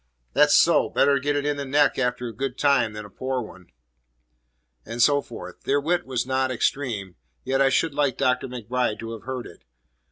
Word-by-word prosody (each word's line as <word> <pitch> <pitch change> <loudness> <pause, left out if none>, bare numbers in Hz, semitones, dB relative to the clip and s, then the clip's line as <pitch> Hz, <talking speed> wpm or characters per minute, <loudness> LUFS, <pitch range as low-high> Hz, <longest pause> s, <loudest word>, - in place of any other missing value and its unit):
"That's - - +5
so! - - +4
Better 140 0 +3
get 145 +3 -1
it 145 0 -1
in 145 0 0
the 140 - -3
neck 145 +1 +2
after 125 -1 -1
a 115 - -7
good 135 0 -4
time 135 -6 +2
than 105 0 -7
a - - -12
poor 130 +5 -3
one." 95 -4 -13 1.2
And 115 - -7
so 145 +4 +4
forth. 90 -9 -10
Their 140 +1 +1
wit 175 +3 -1
was 125 -3 -1
not 130 0 0
extreme, 115 -7 -2 0.3
yet 135 +1 0
I 135 - +5
should 155 +3 +1
like 140 -3 0
Dr. 130 +1 +1
MacBride 125 -2 -2
to 115 0 -6
have 115 -1 -9
heard 130 -1 -4
it. 85 - -14
130 Hz, 200 wpm, -24 LUFS, 115-140 Hz, 1.2 s, That's